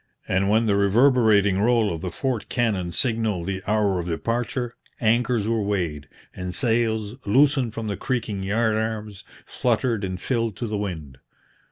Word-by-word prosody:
And 95 +1 +1
when 110 +2 +3
the 105 -2 +2
reverberating 105 -2 +4
roll 115 -3 +3
of 80 - -6
the 90 - -3
fort 115 +3 -3
cannon 105 -8 0
signalled 110 -6 0
the 95 0 -3
hour 105 -3 +2
of 85 - -4
departure, 120 - -2 0.3
anchors 115 -1 +1
were 115 -1 +1
weighed, 85 -8 -2 0.3
and 90 -1 -5
sails, 110 -3 0
loosened 130 +1 +3
from 115 - -4
the 100 -2 -3
creaking 110 -6 -2
yard 110 +3 +1
arms, 110 -2 -3 0.2
fluttered 115 -2 0
and 95 -1 -3
filled 115 -3 -1
to 120 - -4
the 110 -1 -3
wind. 80 -10 -5
110 Hz, 160 wpm, -24 LUFS, 95-115 Hz, 0.3 s, reverberating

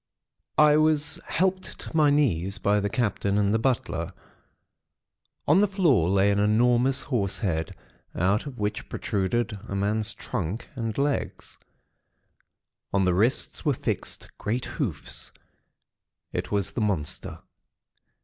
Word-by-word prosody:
"I 150 -1 +6
was 155 -1 +2
helped 185 +1 -1
to - - -9
my 155 -2 +5
knees 100 - +1
by 100 +2 +2
the 100 0 -1
Captain 100 -3 0
and 100 0 +2
the 110 - +2
butler. 110 -9 -1 1.3
On 160 +7 +5
the 210 - +4
floor 160 - +3
lay 100 +1 +3
an 100 - +1
enormous 120 +5 +3
horse 105 -8 -1
head, 80 -7 -2 0.4
out 100 - +1
of 135 -3 -8
which 105 0 -3
protruded 105 +2 -1
a 100 - -4
man's 105 +2 0
trunk 95 +6 -4
and 115 -4 -4
legs. 140 0 -2 1.3
On 100 -1 +2
the 90 - +3
wrists 110 +8 +1
were 145 -4 +2
fixed 115 -7 -3
great 115 +4 -2
hoofs. - - -4 1.0
It - - -3
was 100 -2 0
the 120 - -3
monster. 95 -8 -2
110 Hz, 130 wpm, -26 LUFS, 100-140 Hz, 1.3 s, I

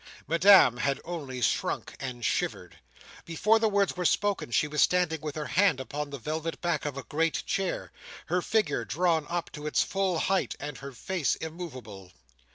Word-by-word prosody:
Madame 170 - +6
had 135 +1 0
only 145 -7 -5
shrunk 110 - -1
and 125 -3 -5
shivered. - - -2 0.4
Before 210 +7 +2
the 220 -1 +2
words 200 -2 +1
were 180 - -3
spoken, 200 -3 +1
she 135 +5 +2
was 150 0 0
standing 175 -3 +2
with 150 -2 -5
her 155 -1 -3
hand 175 +1 +3
upon 145 +2 -4
the 140 - -6
velvet 155 +5 -4
back 170 -4 -1
of 145 -2 -3
a 140 - -5
great 160 +7 -1
chair; 195 -2 -2 0.3
her 180 +2 0
figure 185 - 0
drawn 160 +2 +1
up 175 0 -3
to 150 -1 -7
its 150 - +2
full 195 -3 0
height, 190 +4 0
and 145 -1 -6
her 140 0 -8
face 160 +5 -1
immoveable. 130 - -8
160 Hz, 175 wpm, -28 LUFS, 140-180 Hz, 0.4 s, Madame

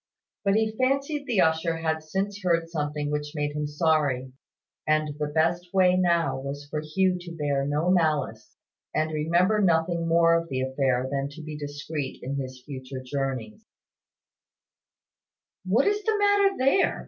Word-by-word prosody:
But 200 0 +2
he 220 0 +1
fancied 275 +3 0
the 230 -6 +2
usher 160 +1 +1
had 160 -1 -1
since 195 +6 -3
heard 170 -2 +2
something 150 -2 -2
which 150 0 -3
made 145 0 -2
him 150 0 -1
sorry; 145 -4 +1 0.5
and 155 -1 +1
the 150 - 0
best 165 +4 0
way 185 -1 +5
now 170 -7 +2
was 140 +1 -6
for 150 - -2
Hugh 180 +4 +1
to 175 -1 -9
bear 140 -2 0
no 150 +5 +1
malice, 160 -5 0 0.4
and 155 +1 +1
remember 175 +7 +2
nothing 170 -2 +2
more 165 0 +4
of 165 0 0
the 130 -1 -2
affair 130 -1 0
than 140 0 -1
to 160 +1 -10
be 155 0 -6
discreet 145 -1 -5
in 140 +2 -3
his 130 -2 -6
future 130 -1 -7
journeys. 135 - -4 2.0
"What 215 +8 +3
is 415 +1 +1
the 440 0 +1
matter 405 -1 +3
there?" 275 +9 +2
160 Hz, 160 wpm, -26 LUFS, 145-180 Hz, 2.0 s, way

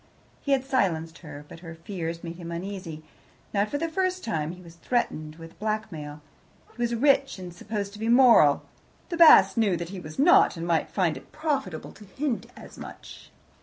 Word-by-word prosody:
He 280 - +1
had 265 -1 +1
silenced 170 -11 -1
her, 145 -3 -10
but 165 - -12
her 165 -1 -9
fears 165 -1 -6
made 170 0 -7
him 170 -1 -7
uneasy. 170 -3 -6 0.5
Not 205 +1 +1
for 290 - -2
the 330 +3 -1
first 370 +2 -1
time, 160 -8 -2
he 180 - -13
was 165 -1 -13
threatened 155 -7 -2
with 165 0 -13
blackmail. 180 -9 -4 0.5
He 240 - -7
was 235 0 0
rich 275 +1 +2
and 180 -2 -8
supposed 200 +2 -5
to 210 - -11
be 225 +1 -2
moral; 235 - +6 0.5
the 340 - -3
Basts 330 -6 +8
knew 205 -6 +2
that 170 0 -5
he 190 0 -7
was 155 -3 -10
not, 300 - +5
and 165 - -4
might 165 -3 +1
find 180 -5 0
it - - -14
profitable 275 - -3
to 210 - -15
hint 260 +5 -3
as - - -12
much. - - -11
190 Hz, 195 wpm, -26 LUFS, 165-240 Hz, 0.5 s, Basts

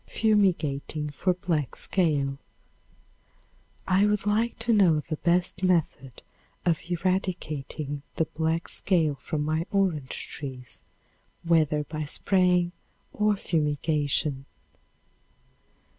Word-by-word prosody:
Fumigating 160 -8 +1
for 180 +5 0
Black 165 -6 -2
Scale. 145 -7 0 1.5
I 190 +2 +4
would 210 -1 0
like 220 +3 +1
to 235 - +1
know 180 -7 +5
the 155 +1 -5
best 175 +2 +1
method 165 -8 0 0.4
of 170 -3 +2
eradicating 165 -6 -2
the 165 - +1
black 160 +2 -2
scale 165 -6 +1
from 150 -1 -2
my 155 +3 -1
orange 180 -9 -1
trees, 130 -3 -8 0.6
whether 155 -3 +2
by 155 0 -5
spraying 180 +2 +3 0.4
or 210 0 +2
fumigation? 150 -4 0
165 Hz, 100 wpm, -27 LUFS, 150-185 Hz, 1.5 s, know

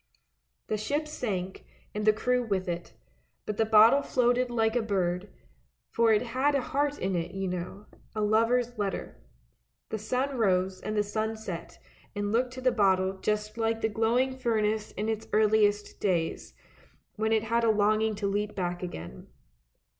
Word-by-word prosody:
The 215 - -1
ship 290 +9 -2
sank, 190 -10 -4 0.3
and 210 0 -2
the 215 - +7
crew 250 +4 0
with 195 -5 -2
it, 175 0 -5 0.5
but 210 - -4
the 220 - +2
bottle 225 +5 +7
floated 250 -1 +1
like 225 -1 +1
a 240 - +3
bird, 190 -3 -1 0.6
for 230 -1 +3
it 215 +1 +3
had 260 +4 +1
a 275 - +2
heart 285 +3 -1
in 190 0 -1
it 175 +2 -3
you 195 0 -2
know 180 +3 -5
— - - -31
a 215 - -1
lover's 230 +2 +2
letter. 195 - -3 0.7
The 220 - -3
sun 255 +5 -1
rose 185 -3 +1
and 215 0 -3
the 210 - +3
sun 220 +2 -2
set 175 -6 -7 0.4
and 205 0 -2
looked 245 +3 +1
to 255 - -7
the 255 0 +3
bottle 190 -3 +2
just 210 +2 -2
like 225 0 0
the 220 - +1
glowing 235 +5 +1
furnace 220 -4 0
in 210 - -3
its 220 -1 -2
earliest 210 -1 +2
days, 175 -5 -1 0.6
when 220 +1 0
it 220 -1 +2
had 230 +1 +1
a 230 - +4
longing 215 +1 +2
to 200 0 -2
leap 205 +1 -2
back 175 -2 -2
again. 85 - -7
215 Hz, 175 wpm, -28 LUFS, 195-230 Hz, 0.7 s, the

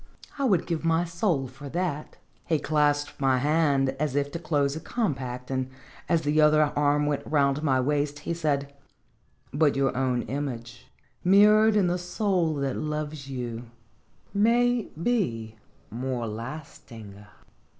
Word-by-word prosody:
I 275 - +1
would 190 -9 +2
give 165 -2 -3
my 165 +1 +2
soul 170 -5 -1
for 135 +3 -10
that." 170 -2 -3 0.3
He 165 -2 +2
clasped 145 -1 0
my 135 -1 +3
hand 145 -1 +2
as 150 -3 -1
if 145 0 0
to 170 - -4
close 145 -3 0
a - - -4
compact, 135 - -3
and, 130 -1 -1 0.4
as 165 -2 +2
the 150 +1 +2
other 150 -1 +4
arm 145 0 +2
went 145 -1 -1
round 140 -1 +2
my 135 -4 +2
waist, 145 +2 -1
he - - -3
said: 145 -4 -1 0.8
"But 145 0 +3
your 135 -1 +1
own 125 -2 0
image, 125 -4 -5 0.4
mirrored 210 +3 +6
in 205 -3 +4
the 175 +1 0
soul 180 -3 0
that 140 -2 -2
loves 150 -2 -4
you, 120 -3 -5 0.6
maybe 210 - +1 0.3
more 125 +1 -3
lasting." 115 -3 -8
145 Hz, 140 wpm, -26 LUFS, 135-165 Hz, 0.8 s, mirrored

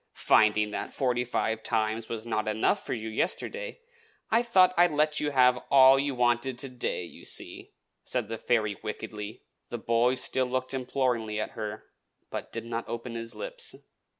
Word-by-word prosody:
"Finding 105 -1 +4
that - - -4
forty 125 -2 +1
five 115 -2 -1
times 110 0 -1
was 115 -1 -3
not 110 -2 -1
enough 110 +1 +1
for - - -3
you 110 -1 -5
yesterday, 480 - -2 0.5
I 225 +1 +5
thought 190 -7 +5
I 175 +1 +6
would 150 -4 -5
let 150 0 +2
you 150 - 0
have 125 -3 +4
all 135 0 +7
you 140 -1 -1
wanted 120 +1 +1
to 135 +2 -1
day, 125 -7 -3
you - - -12
see," - - -4 0.3
said 125 -4 -1
the 115 0 -5
fairy 110 -4 +1
wickedly. 110 0 -6 0.3
The 120 - -4
boy 115 +2 +2
still 130 0 0
looked 130 +1 -2
imploringly 125 -4 -1
at 110 - -3
her, 105 0 -5 0.5
but - - -5
did - - -5
not 115 0 -4
open 115 0 -5
his 115 0 -5
lips. - - -4
120 Hz, 180 wpm, -28 LUFS, 110-135 Hz, 0.5 s, all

